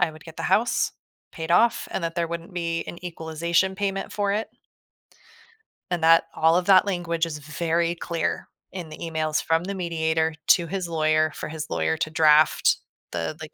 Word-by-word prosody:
I 175 -2 +3
would 155 0 -14
get 160 -1 -12
the - - -5
house, 215 +6 +2 0.4
paid 160 0 -6
off, 230 +6 +3
and 190 - -2
that 165 +1 -3
there 170 -1 +1
wouldn't 170 +2 -6
be 165 -1 -2
an 175 - -9
equalization 170 +3 -1
payment 195 -1 -2
for 200 -1 0
it. 215 +2 -2 1.4
And 175 -2 -1
that 165 0 +6
all 160 +1 +4
of 180 - 0
that 190 0 +6
language 170 -3 -1
is 160 -2 -5
very 165 +3 -1
clear 170 0 -3 0.2
in 180 -4 -7
the 155 - -9
emails 155 -2 -2
from 165 +1 +1
the 200 +1 -4
mediator 160 -2 0
to 170 -2 +5
his 185 -1 -3
lawyer, 155 -1 +2
for - - -5
his 155 -1 -6
lawyer - - 0
to 155 - -2
draft 155 -1 +4 0.3
the, 90 - -3
like, 155 - -9
165 Hz, 185 wpm, -24 LUFS, 160-180 Hz, 1.4 s, that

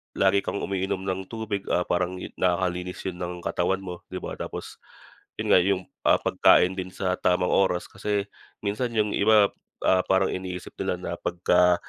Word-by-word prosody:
lagi 95 +1 +3
kang 100 - -3
umiinom 95 -1 -2
ng 95 0 -1
tubig, 110 -3 -3
ah, 90 - +1
parang 90 +1 0 0.2
nakakalinis 90 0 0
yun 90 - -3
ng 90 0 -3
katawan 95 +2 0
mo, 90 -2 -8
di - - -4
ba? - - -6
Tapos - - -6 0.7
yun - - -3
nga, - - +7
yung, 95 0 +1 0.2
ah, - - +5
pagkain 95 +1 +4
din 90 0 -5
sa 90 -1 -1
tamang 90 0 +2
oras. 90 -2 +2
Kasi 100 +1 -2 0.3
minsan 105 +4 -2
yung 105 -1 +3
iba, 105 -1 +5 0.4
ah, 95 0 +5
parang 95 +1 +2
iniisip 90 -1 -6
nila - - 0
na 85 -1 -5
pagka 90 +1 +3
95 Hz, 170 wpm, -26 LUFS, 90-100 Hz, 0.7 s, nga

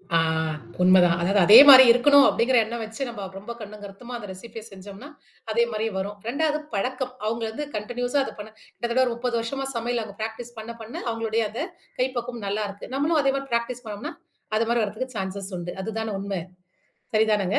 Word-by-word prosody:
ஆ - - +6 0.6
உண்ம 185 +1 +6
தான். 170 -1 +3
அதாது 195 +4 +2
அதே 205 +5 +9
மாரி 260 -1 +12
இருக்கணும், 275 +4 +6
அப்படிங்கற 250 +2 +2
எண்ணம் 235 +1 -5
வச்சு 220 +5 -5
நாம 210 -4 -6
ரொம்ப 205 +4 -8
கண்ணும் 210 -1 -10
கருத்துமா 220 +5 -9
அந்த 210 - -9
ரெசிபிய 220 +4 -9
செஞ்சோம்னா, 200 +8 -11 0.4
அதே 235 +2 +3
மாரி 215 0 -2
வரும். 200 +2 -4
2ஆவது 300 +4 0
பழக்கம். 255 +5 -2
அவங்க 230 +1 -2
வந்து, 260 +7 -5
கண்டினீயூஸா 245 +5 -2
அதப் - - -9
பண்ண 210 +1 -8
கிட்டத்தட்ட 240 +3 -1
30 240 +1 -3
வருஷமா 270 +4 -4
சமையல 235 0 -1
அவங்க 200 -2 -11
ப்ராக்டிஸ் 230 +2 -6
பண்ண, 225 +2 -7
பண்ண 225 +1 -9
அவங்களோடய 225 -1 -1
அத 225 - -6 0.4
கைப்பக்குவம் 245 -3 -3
நல்லா 210 +2 -1
இருக்கு. 200 +4 -10
நம்மளும் 305 +3 +2
அதே 275 -1 +2
மாரி 275 0 -4
ப்ராக்டிஸ் 235 +1 -2
பண்ணோம்னா, 220 +10 -6 0.4
அது 225 +1 +2
மாதிரி 235 -1 +2
வர்றதுக்கு 220 +5 -5
சான்சஸ் 195 0 -5
உண்டு. 175 0 -5
அதுதான 220 0 -4
உண்ம! 195 -2 -3 0.7
சரிதானங்க? 210 -3 +2
225 Hz, 180 wpm, -24 LUFS, 205-245 Hz, 0.7 s, மாரி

